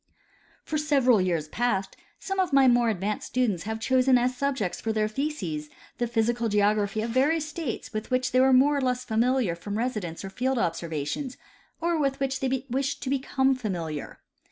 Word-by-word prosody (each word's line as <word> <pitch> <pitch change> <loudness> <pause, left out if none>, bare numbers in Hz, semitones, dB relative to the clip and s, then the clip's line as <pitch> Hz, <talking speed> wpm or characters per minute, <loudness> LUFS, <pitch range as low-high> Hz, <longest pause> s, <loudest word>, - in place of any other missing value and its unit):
For 310 -2 -2
several 270 -8 +3
years 170 -4 0
past, 200 -4 -1 0.2
some 385 0 -4
of 370 -3 +1
my 275 -1 +6
more 240 -1 +4
advanced 205 0 -2
students 220 -9 0
have 220 +1 -3
chosen 255 +2 +3
as 250 +1 +1
subjects 260 -8 -2
for 225 - -1
their 215 -1 +1
theses 215 - -3 0.3
the 240 - +1
physical 235 0 0
geography 210 0 +1
of 230 - -3
various 300 +5 +2
states 310 -6 -5
with 215 0 -4
which 255 +1 0
they 255 - +4
were 265 0 +5
more 270 +3 +5
or - - 0
less 250 -1 0
familiar 230 -4 +1
irom 205 +5 -5
residence 210 -9 -3
or 195 - -7
field 260 +5 -1
observation, 165 - -2 0.5
or 335 -1 0
with 275 -1 0
which 270 0 -1
they 265 -1 -1
wished 270 +2 -1
to 265 - -2
become 270 0 +1
familiar. 175 - -4
245 Hz, 180 wpm, -26 LUFS, 210-270 Hz, 0.5 s, my